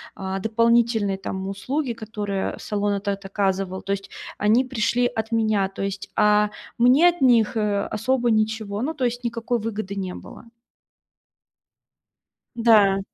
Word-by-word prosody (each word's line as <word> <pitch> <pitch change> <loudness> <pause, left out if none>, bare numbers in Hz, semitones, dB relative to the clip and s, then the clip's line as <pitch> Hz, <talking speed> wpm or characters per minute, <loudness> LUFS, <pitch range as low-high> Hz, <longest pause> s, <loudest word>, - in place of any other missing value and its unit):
а, 190 0 -4
дополнительные, 225 -1 +2
там, 190 0 -5
услуги, 250 +6 -2
которые 210 -3 -4
салон 205 -1 -1
этот 200 0 -3
оказывал. 195 -1 -2
То 195 - -4
есть 195 0 -6 0.3
они 220 +5 +3
пришли 245 -1 0
от 220 -1 -3
меня, 215 -4 +1
то 195 - -6
есть, 195 0 -4
а 210 0 +4 0.3
мне 265 +9 +6
от 345 -4 -5
них, 235 -4 +4
э, 205 -1 0
особо 245 +1 +1
ничего, 215 -1 -1
ну, 310 +4 -2
то 255 - -1
есть 245 +1 -2
никакой 235 0 -2
выгоды 215 -2 -4
не 185 -2 -4
было. - - -12 2.1
Да. 210 -4 +4
215 Hz, 140 wpm, -23 LUFS, 200-235 Hz, 2.1 s, мне